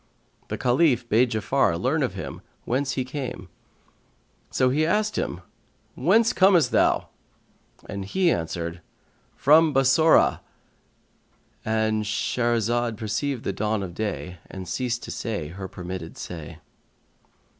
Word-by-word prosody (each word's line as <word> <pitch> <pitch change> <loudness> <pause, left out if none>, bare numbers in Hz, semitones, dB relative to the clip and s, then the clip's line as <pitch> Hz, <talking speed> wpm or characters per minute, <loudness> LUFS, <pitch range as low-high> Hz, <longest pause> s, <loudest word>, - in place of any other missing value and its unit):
The - - -4
Caliph 125 -1 +2
bade 120 +3 +3
Ja'afar 110 -5 +1
learn - - +1
of - - -1
him - - -6 0.2
whence 130 +2 0
he 130 - -2
came; 125 -9 -6 1.0
so 130 -1 +2
he 150 +4 +2
asked 210 +6 +1
him, - - -3 0.5
"Whence 230 0 +3
comest 185 -4 +4
thou?" - - +2 0.8
and 100 -1 -5
he 175 - +2
answered, 85 - -3 0.5
"From 155 +2 +5
Bassorah."—And 110 -5 0
Shahrazad 115 +1 0
perceived 115 +4 -2
the 100 - -2
dawn 105 +1 -1
of 90 -2 -6
day 90 -3 -4
and 95 -1 -8
ceased 120 +5 -2
to - - -6
say 105 -10 -4
her 95 +3 -7
permitted 90 -2 -7
say. 80 -4 -8
115 Hz, 120 wpm, -25 LUFS, 95-135 Hz, 1.0 s, From